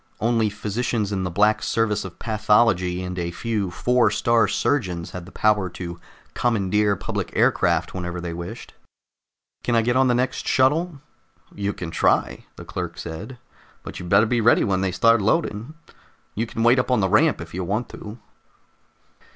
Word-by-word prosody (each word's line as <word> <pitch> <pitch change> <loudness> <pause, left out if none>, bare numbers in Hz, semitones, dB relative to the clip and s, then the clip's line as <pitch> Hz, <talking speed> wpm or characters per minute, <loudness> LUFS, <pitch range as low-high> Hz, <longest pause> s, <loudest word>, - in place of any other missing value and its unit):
Only 115 -1 +1
physicians 105 0 -2
in 95 -2 -1
the 90 - -2
Black 105 +5 +2
Service 110 -2 0
of 95 -3 -9
Pathology 105 -5 +2
and 90 0 -5
a 85 0 -2
few 105 +1 -2
Four 120 +5 +2
star 115 +2 +2
Surgeons 90 -12 -1
had 90 -1 -8
the - - -12
power 105 -3 +1
to 85 -1 -6 0.3
commandeer 105 -3 +1
public - - -4
aircraft - - +2
whenever 90 -1 -4
they 85 -1 -5
wished. 85 +1 -8 0.9
"Can 120 - 0
I 115 - +3
get 120 +2 +1
on 130 0 +4
the 120 - +2
next 125 +2 -1
shuttle?" 150 +3 +1 0.5
"You 100 0 -2
can 85 -4 -7
try," - - +1
the - - -10
clerk - - -5
said, 100 +10 -7 0.5
"but - - -8
you'd 90 - -7
better 100 +4 +5
be 120 +1 0
ready 115 +2 +4
when 95 -2 0
they 95 -1 0
start 115 +4 +4
loading. 115 +3 -1 0.6
You 115 +3 -2
can 115 - -3
wait 120 +2 +5
up 125 - -1
on 125 -3 +3
the 95 - +2
ramp 145 - +3
if 85 -1 -9
you 90 +1 -3
want 105 +7 -2
to." 105 +2 -9
105 Hz, 175 wpm, -23 LUFS, 95-120 Hz, 0.9 s, better